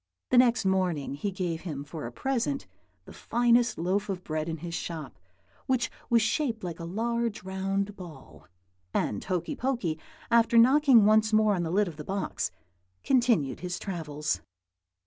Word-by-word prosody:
The 250 - +5
next 240 -4 +4
morning 180 -7 0
he 145 +9 -2
gave 180 -4 -3
him 150 -6 -5
for 145 -2 -7
a - - -8
present 270 - -1 0.4
the - - -12
finest 240 0 +2
loaf 190 +5 -1
of 185 -2 -3
bread 155 0 -3
in 165 - -3
his 170 +2 -7
shop, 165 -2 -5 0.5
which 255 -3 +1 0.2
was 230 -2 +4
shaped 225 -1 -1
like 175 -2 -5
a 170 - -5
large 230 +4 -2
round 195 +1 -2
ball; 135 - -12 0.5
and 100 - 0
Hokey 185 - -2
Pokey, 235 -13 -1 0.3
after 235 0 +4
knocking 260 -2 +6
once 215 +1 +4
more 215 -1 +4
on 180 - 0
the 165 - -2
lid 200 +4 +2
of 160 -4 -8
the 150 - -6
box, 195 +4 -2 0.5
continued 235 - +2
his 180 0 -4
travels. 155 -5 -3
195 Hz, 165 wpm, -28 LUFS, 165-235 Hz, 0.5 s, knocking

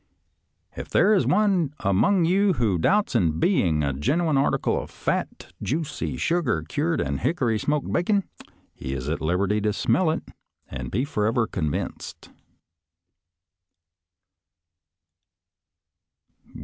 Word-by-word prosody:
" - - -42
If - - -7
there 215 - +4
is 195 - +2
one 185 -8 +2
among 165 - +2
you 195 +3 +3
who 110 - 0
doubts 205 - +2
its 85 -10 +2
being 85 - +2
a 70 -1 0
genuine 155 - 0
article 135 +1 +1
of - - -10
fat, - - -4
juicy, 155 +3 -3
sugar 150 - 0
cured, 160 - -1
and 70 -1 -2
hickory 120 - 0
smoked 150 +3 -1
bacon, 200 +3 +1 0.5
he 65 - -6
is 65 0 -5
at 80 - -2
liberty 95 +6 0
to 105 0 +1
smell 170 - +1
it 155 - -1 0.4
and 65 -2 -6
be 125 +7 -1
forever 115 -3 0
convinced." 80 -9 -5
125 Hz, 125 wpm, -24 LUFS, -, 0.5 s, there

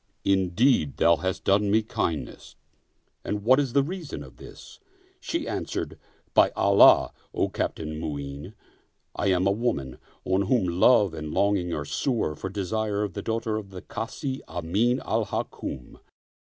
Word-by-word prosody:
Indeed, 95 - +2
thou 85 0 +4
hast 95 0 -3
done 100 +1 +3
me 110 +2 +3
kindness, 85 -8 -4 0.7
and 105 -1 -3
what 130 +5 +5
is 135 -4 -1
the 140 - +4
reason 160 - -6
of 65 - -14
this? - - -13 0.2
" - - -32
She - - -3
answered, - - -4 0.2
" - - -38
By - - +6
Allah, 100 0 +6 0.2
O - - +1
Captain 80 -1 -3
Mu'in, 70 -2 -6 0.6
I - - -1
am 95 -1 +2
a 100 - +4
woman 100 - -2 0.3
on 95 +1 +1
whom 120 -5 +2
love 95 +2 +4
and 75 -1 -6
longing 100 -2 +1
are 75 - -4
sore 80 - -1
for 95 - -5
desire 105 +2 -2
of 100 -4 -4
the - - -4
daughter 115 -1 -2
of 105 -2 -7
the 95 -2 -9
Kazi 130 +4 -5
Amin 100 +9 0
al - - 0
Hukm. 60 - -5
100 Hz, 160 wpm, -26 LUFS, 85-110 Hz, 0.7 s, By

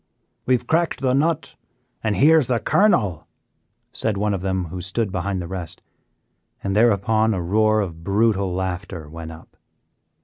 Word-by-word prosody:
"We 130 - +5
have 125 - -4
cracked 165 +3 0
the 130 -2 +2
nut 155 +4 0 0.5
and 110 -2 0
here 155 - +6
is 135 - -1
the 125 - +1
kernel," 105 - +2 0.6
said 110 -2 -2
one 105 +1 0
of 95 - -3
them 95 -1 -1
who 90 +2 -6
stood 95 +4 -2
behind 95 +1 -2
the - - -7
rest, 90 -3 -7 0.8
and 95 0 -1
thereupon 110 0 +3
a 90 - -2
roar 110 +4 +2
of 85 -4 -6
brutal 100 0 +1
laughter 90 -3 -4
went 80 +1 -8
up. 80 0 -14
100 Hz, 165 wpm, -22 LUFS, 90-115 Hz, 0.8 s, here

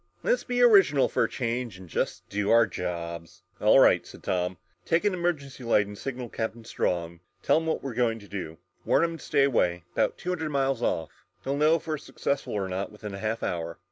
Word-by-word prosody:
Let's - - +2
be 245 0 +1
original 195 - +6
for - - +2
a - - -4
change 120 -4 -3
and 95 -1 -12
just - - -3
do 100 0 -2
our 115 0 +6
jobs!" 85 -3 -6 0.2
"All - - +6
right," - - +6
said - - -13
Tom. 90 0 -1 0.3
"Take 165 +4 +1
an 205 - +3
emergency 155 -7 -2
light 110 -3 +3
and 105 +1 -9
signal 125 +2 -5
Captain 115 0 -4
Strong. 85 -5 -2 0.2
Tell - - +4
him 160 0 -1
what 160 - -1
we're 135 -3 -4
going 115 -1 +1
to 100 -2 -13
do. 90 -5 -6 0.3
Warn - - +3
him 165 0 -1
to - - -12
stay 140 - +2
away 90 -11 +1
about - - +1
two 180 - -5
hundred 160 -4 -2
miles 135 -3 0
off. 80 -8 -2 0.2
He'll 135 - -1
know 155 +3 +4
if 165 - -4
we're 155 -2 -2
successful 140 0 -3
or 100 -2 -1
not 95 +1 -3
within 105 -1 -8
a 100 - -6
half 110 +2 -2
hour!" 85 -2 -3
115 Hz, 220 wpm, -27 LUFS, 95-145 Hz, 0.3 s, original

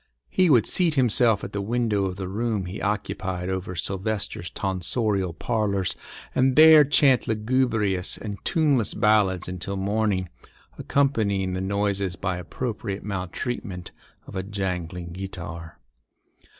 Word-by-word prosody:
He 185 -2 +3
would 120 -7 +5
seat 170 -4 +3
himself 120 -4 +3
at 100 - -6
the 100 - -2
window 110 -2 0
of 95 -1 -3
the 95 -1 -5
room 105 0 -2
he 90 +3 -6
occupied 95 -3 -2
over 95 -1 -3
Silvester's 95 -1 -3
tonsorial 95 0 -1
parlours 100 0 -1 0.4
and 130 0 +2
there 155 -1 +9
chant 135 -3 +3
lugubrious 110 -4 0
and 105 -2 -7
tuneless 145 - +1
ballads 105 -4 +2
until 90 +2 -4
morning, 100 -1 0 0.5
accompanying 105 -9 0
the 95 - -2
noises 100 -1 -1
by 90 -1 -2
appropriate 100 +2 -4
maltreatment 95 -1 -4 0.3
of - - -11
a 95 - -1
jangling 90 -3 -4
guitar. 85 -3 -7
100 Hz, 125 wpm, -25 LUFS, 95-115 Hz, 0.5 s, there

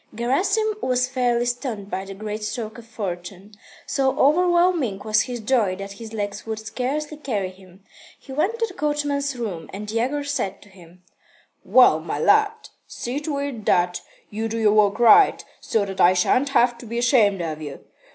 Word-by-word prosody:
Gerasim 380 - 0
was 250 0 +1
fairly 245 -2 0
stunned 240 -5 -4
by 190 - -3
the 195 0 -8
great 215 +1 -5
stroke 220 +1 -5
of 230 - -14
fortune. 190 -2 -6 0.3
So 270 0 0
overwhelming 345 - +3
was 215 0 +3
his 245 -2 -4
joy 220 -4 +1
that 195 +1 -7
his 220 +2 -10
legs 205 -2 -4
would 220 -1 -4
scarcely 275 +7 -4
carry 210 -10 -3
him. 185 0 -18 0.4
He 270 - -13
went 375 +11 0
to 460 - +1
the 410 - -10
coachman's 290 -3 -1
room, 195 -9 -5
and 210 +2 -6
Yegor 255 +6 -1
said 200 -9 -3
to 205 - -19
him: 180 -1 -18 0.6
"Well, 250 -11 +5
my 160 -2 -4
lad, 430 - +2 0.2
see 250 +4 -4
to 295 -1 -3
it 280 -6 -4
that 175 0 +2 0.3
you 220 +2 -2
do 225 - -3
your 215 -2 +3
work 210 -1 +3
right, 380 - +6
so 215 -3 0
that 195 -1 -3
I 180 +1 +6
shan't 255 +9 +2
have 240 -3 +2
to 235 - -10
be 235 +2 -4
ashamed 220 -6 +3
of 155 -2 -5
you. 145 -3 -8
230 Hz, 180 wpm, -23 LUFS, 200-280 Hz, 0.6 s, right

